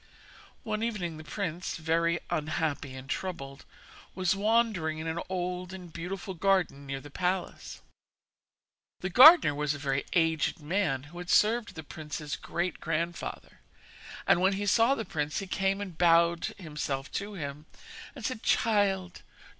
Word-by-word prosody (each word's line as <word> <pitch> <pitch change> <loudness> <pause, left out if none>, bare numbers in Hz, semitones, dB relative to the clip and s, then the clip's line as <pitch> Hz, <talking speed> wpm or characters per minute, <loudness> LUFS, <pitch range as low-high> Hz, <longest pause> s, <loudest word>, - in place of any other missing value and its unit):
One 215 0 -2
evening 195 -8 -2
the 155 - -9
prince, 175 +3 -4
very 165 +1 +1
unhappy 150 -3 -2
and 130 +1 -9
troubled, 140 -5 -5 0.5
was 185 +1 +1
wandering 210 -6 +1
in 155 - -5
an 165 +1 -2
old 180 0 -3
and 180 -3 -10
beautiful 185 +3 -5
garden 180 -6 +1
near 135 0 -3
the 145 +1 -12
palace. 180 +3 -3 1.2
The 185 - -3
gardener 275 - +9
was 150 0 -1
a - - -6
very 140 -1 -1
aged 160 -2 +2
man, 150 -4 0
who 165 +5 -11
had 180 0 -7
served 230 +3 +3
the 160 - -7
prince's 150 -1 -6
great 175 0 -3
grandfather; 165 +2 -4 0.7
and 175 - +4
when 190 +1 +4
he 200 +1 -2
saw 230 +6 +4
the 225 - -4
prince 150 -2 -2
he 195 - -2
came 195 +1 0
and 195 -4 -6
bowed 170 0 +4
himself 150 -6 -4
to 205 +1 -7
him, 150 -2 -6 0.5
and 250 -6 -7
said: 255 -3 -3
'Child! 195 -5 +1
175 Hz, 150 wpm, -29 LUFS, 155-195 Hz, 1.2 s, gardener